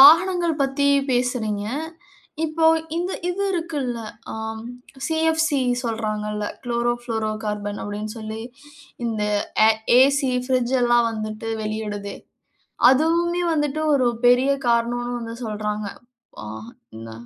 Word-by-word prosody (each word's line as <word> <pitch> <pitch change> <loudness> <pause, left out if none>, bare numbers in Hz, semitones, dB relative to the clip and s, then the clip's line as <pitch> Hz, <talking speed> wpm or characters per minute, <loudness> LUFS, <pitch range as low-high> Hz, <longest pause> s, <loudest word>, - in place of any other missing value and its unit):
வாகனங்கள் 335 +1 +6
பத்தி 280 +1 +1 0.2
பேசுறீங்க. 235 -5 0 0.8
இப்போ 320 +1 0 0.3
இந்த 355 +2 -1 0.2
இது 380 +3 -1
இருக்குல்ல. 295 -9 -2 0.3
ஆ - - -5 0.7
சிஎப்சி 320 -2 +2 0.2
சொல்றாங்கல்ல. 215 -2 -2 0.2
குளோரோ 240 0 +1
புளோரோ 220 -2 -1
கார்பன் 205 -1 -3
அப்டின்னு 210 +1 -5
சொல்லி 220 0 -6 0.7
இந்த 220 -2 -1 0.4
ஆ - - +7 0.3
ஏசி, 275 0 +4 0.2
ஃபிரிட்ஜ் 255 -1 +1
எல்லாம் 240 -1 +4
வந்துட்டு 215 0 -5
வெளியிடுதே. 210 -1 -4 0.8
அதுவுமே 340 +5 +2
வந்துட்டு 295 0 0
ஒரு 255 -3 +3 0.2
பெரிய 250 +3 +5 0.2
காரணம்ன்னு 240 +1 +1
வந்து 230 0 -6
சொல்றாங்க. 210 -1 -3 0.6
ஆ - - -6 0.5
இந்த 115 0 -8
240 Hz, 110 wpm, -23 LUFS, 215-295 Hz, 0.8 s, ஆ